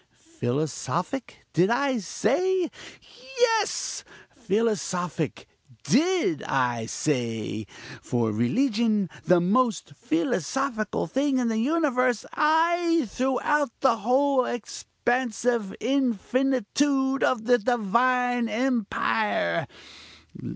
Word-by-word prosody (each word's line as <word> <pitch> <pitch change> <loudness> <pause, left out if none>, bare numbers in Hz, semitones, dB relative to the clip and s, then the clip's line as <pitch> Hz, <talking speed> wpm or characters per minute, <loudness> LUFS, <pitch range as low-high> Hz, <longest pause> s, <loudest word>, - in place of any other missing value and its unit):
"Philosophic, 160 - -3
did 175 +4 +3
I 260 +1 +1
say? 345 - 0 0.7
Yes: 450 -4 +1 0.3
philosophic 195 - -2 0.4
did 315 - +2
I 120 -4 -1
say. 115 -7 -2 0.3
For 115 -3 -1
religion 215 - +1
is - - -19
the 180 -1 +6
most 205 - +1
philosophical 265 - -1
thing 270 - 0
in 245 -2 +1
the 220 -1 0
universe 255 -4 +1
ay! 330 +1 +2
throughout 265 +1 0
the 250 -4 +3
whole 260 +4 +2
expansive 240 -2 -2
infinitude 265 +2 0
of 230 -4 +1
the 245 0 +4
divine 245 +2 +1
empire. 220 - 0
245 Hz, 85 wpm, -25 LUFS, 195-270 Hz, 0.7 s, the